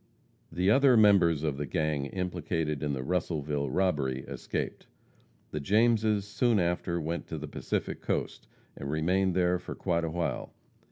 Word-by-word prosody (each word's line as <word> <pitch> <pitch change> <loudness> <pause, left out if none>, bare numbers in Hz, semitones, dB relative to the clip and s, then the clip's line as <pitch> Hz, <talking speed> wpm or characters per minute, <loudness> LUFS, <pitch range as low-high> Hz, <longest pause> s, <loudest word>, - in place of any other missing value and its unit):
The 90 +3 +2
other 135 0 +5
members 90 -8 +5
of 75 -3 -1
the 75 0 -3
gang 75 0 -1
implicated 80 -4 -2
in 75 -2 -1
the 65 -1 -3
Russellville 75 -3 -1
robbery 75 -8 0
escaped. 65 -4 -5 0.6
The 75 - -3
Jameses 110 +3 +2
soon 115 +2 +1
after 85 0 0
went 85 +2 -3
to 80 - -5
the 75 0 -6
Pacific - - -3
Coast, - - -3 0.3
and 70 - -6
remained 90 +5 +1
there 90 -1 +2
for 90 - -7
quite 85 -3 0
a 80 - -1
while. 85 +1 -3
85 Hz, 155 wpm, -29 LUFS, 75-95 Hz, 0.6 s, other